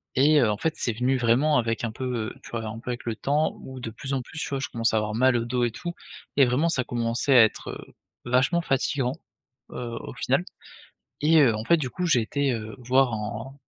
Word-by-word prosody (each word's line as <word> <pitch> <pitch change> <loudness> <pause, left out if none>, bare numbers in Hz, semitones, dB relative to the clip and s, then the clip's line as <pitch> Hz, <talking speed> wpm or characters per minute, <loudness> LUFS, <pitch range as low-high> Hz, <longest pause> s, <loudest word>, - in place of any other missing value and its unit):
et 145 +3 +5
heu, 115 -5 +3
en 105 - +1
fait, 160 +8 -2
c'est 120 - 0
venu 125 +3 +1
vraiment 125 +6 +3
avec 115 -1 -1
un 115 - -1
peu, 130 +4 -6 0.2
heu, - - -12
tu - - -13
vois? 115 -1 -3
Un 110 +1 -6
peu 125 - -5
avec 120 - -5
le 115 -2 -3
temps 150 +5 0
où 130 -1 -9
de 115 - -4
plus 135 +5 -6
en 130 - 0
plus, 155 +6 -9
tu - - -3
vois, 135 -1 -2
je 130 - -4
commençais 115 -1 0
à - - +4
avoir 105 0 -2
mal 130 +1 +4
au 115 - +1
dos 120 +1 0
et 120 - -1
tout, 175 +9 -5 0.5
et 140 - +7
vraiment, 130 +7 +1
ça 125 -6 0
commençait 120 +3 +1
à 115 - +10
être, 110 - -1
heu, - - -10 0.3
vachement 130 +8 +2
fatigant, 135 -3 0 0.6
heu, 120 -2 -5
au - - -8
final, - - 0 0.8
et 160 +2 +5
heu, 120 -6 +4
en 110 - -4
fait, 170 - +4
du 140 -5 -3
coup, 180 +7 -3
j'ai 155 -8 +4
été, 140 +4 0
heu, 110 -2 -6
voir 125 0 +2
un 110 +4 -5
125 Hz, 250 wpm, -25 LUFS, 115-140 Hz, 0.8 s, à